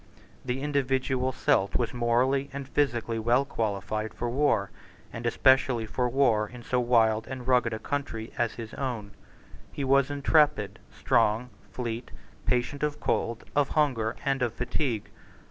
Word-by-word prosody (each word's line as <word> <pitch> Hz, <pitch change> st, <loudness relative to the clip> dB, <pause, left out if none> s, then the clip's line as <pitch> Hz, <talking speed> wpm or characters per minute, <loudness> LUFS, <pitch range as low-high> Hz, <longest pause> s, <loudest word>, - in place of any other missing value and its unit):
The 130 Hz, +1 st, -2 dB
individual 130 Hz, -2 st, 0 dB
Celt 125 Hz, -7 st, +1 dB
was 120 Hz, -3 st, 0 dB
morally 125 Hz, +3 st, +1 dB
and 140 Hz, -1 st, -6 dB
physically 120 Hz, -6 st, 0 dB
well 120 Hz, +5 st, +2 dB
qualified 110 Hz, -1 st, -3 dB
for 120 Hz, 0 st, -2 dB
war, 130 Hz, -7 st, +1 dB, 0.4 s
and 115 Hz, +1 st, -3 dB
especially 130 Hz, -1 st, +3 dB
for 125 Hz, +2 st, -1 dB
war 120 Hz, -5 st, +2 dB
in 125 Hz, 0 st, -11 dB
so 125 Hz, +2 st, 0 dB
wild 115 Hz, -3 st, +3 dB
and 130 Hz, -2 st, -7 dB
rugged 125 Hz, -2 st, +3 dB
a 110 Hz, -, -2 dB
country 115 Hz, -2 st, -4 dB
as 120 Hz, -2 st, 0 dB
his 115 Hz, -2 st, -8 dB
own. 120 Hz, -7 st, -4 dB, 0.6 s
He 140 Hz, -, -4 dB
was 135 Hz, 0 st, +3 dB
intrepid, 145 Hz, -, +2 dB
strong, 115 Hz, +4 st, +1 dB, 0.2 s
fleet, 120 Hz, -1 st, -4 dB, 0.4 s
patient 125 Hz, +3 st, 0 dB
of 150 Hz, -1 st, -1 dB
cold, 115 Hz, 0 st, -1 dB
of 145 Hz, -2 st, +3 dB
hunger, 125 Hz, -8 st, +1 dB
and 135 Hz, -1 st, +1 dB
of 120 Hz, -2 st, 0 dB
fatigue. 125 Hz, -2 st, -2 dB
125 Hz, 145 wpm, -28 LUFS, 115-135 Hz, 0.6 s, especially